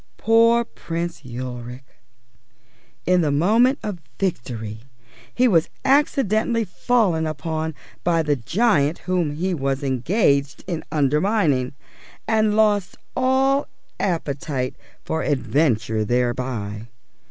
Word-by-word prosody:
Poor 230 +1 +4
Prince 170 -5 -5
Ulric! 125 0 -7 1.2
In 180 0 +3
the 155 - +1
moment 220 - +3
of 195 -5 -4 0.2
victory 115 - -3 0.5
he 250 - +3
was 165 -8 +3 0.2
accidentally 240 -5 +2
fallen 185 -5 +1
upon 155 +1 -3 0.3
by 165 -2 +2
the 150 -1 +1
giant 160 - +1
whom 175 -5 0
he 185 +4 -1
was 135 -2 -1
engaged 140 - +1
in 170 -4 -4
undermining, 150 - +1 0.5
and 215 -1 +2
lost 210 -3 +2 0.2
all 265 +2 +2 0.3
appetite 145 -7 -2 0.3
for 160 0 -1
adventure 125 -6 +1
thereby. 120 -2 -2
160 Hz, 100 wpm, -22 LUFS, 130-210 Hz, 1.2 s, Poor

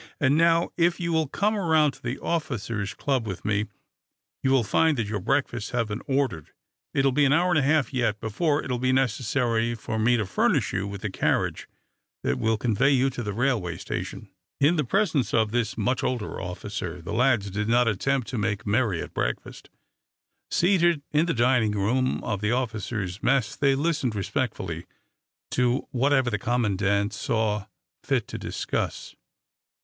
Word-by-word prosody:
And 140 0 +3
now, 165 +1 +3
if 170 0 +2
you 170 -1 -1
will 160 -2 +2
come 210 +9 0
around 160 -6 +3
to 135 - -18
the 125 +2 -3
officers' 115 - -3
club 130 -5 -1
with 95 -3 -6
me, 105 0 0 0.7
you 135 - +1
will 135 -2 +4
find 155 +8 +2
that 115 - 0
your 105 0 -3
breakfasts 120 +2 -1
have 115 -3 0
been 105 +3 -4
ordered. 130 - -1 0.4
It 135 - +1
will 135 - +4
be 145 +3 +2
an 140 - +4
hour 175 +3 +3
and 155 - +4
a - - +2
half, 145 -1 +2
yet, 120 -4 0
before 145 +7 0
it - - -5
will 125 - -1
be 130 +1 +1
necessary 120 -2 +1
for 110 0 -4
me 120 +3 +3
to 105 - -1
furnish 95 - +1
you 95 +1 -1
with 100 -1 -7
the 105 - -3
carriage - - -1 0.5
that 65 +1 0
will 110 0 +1
convey 120 +4 +2
you 135 -1 +3
to 125 - -5
the 105 -3 -3
railway 110 -7 0
station." - - -6 0.3
In 150 +5 +4
the 155 - +1
presence 165 - +1
of 110 -2 +2
this 120 -2 -1
much 125 +4 0
older 120 -4 -2
officer 90 -1 -5
the 85 - -6
lads 120 -4 +2
did 105 +3 -2
not 120 +1 +4
attempt 125 +4 0
to 125 - -3
make 105 +1 -1
too 100 - -3
merry 110 -6 +1
at - - -10
breakfast. 60 - -4 0.8
Seated 175 -4 +3
in 150 +3 +2
the 165 - +1
dining 120 -3 +3
room 120 +6 0
of 100 -3 -2
the 105 +1 +1
officers' 110 -5 -2
mess, 135 -5 +1
they 140 -1 +2
listened 140 -6 0
respectfully 95 - -3 0.6
to 125 +1 +1
whatever 135 -1 +2
the 105 - -1
commandant 100 -3 +1
saw 110 -3 -1 0.3
fit - - 0
to - - -5
discuss. 60 0 -3
120 Hz, 185 wpm, -26 LUFS, 105-140 Hz, 0.8 s, will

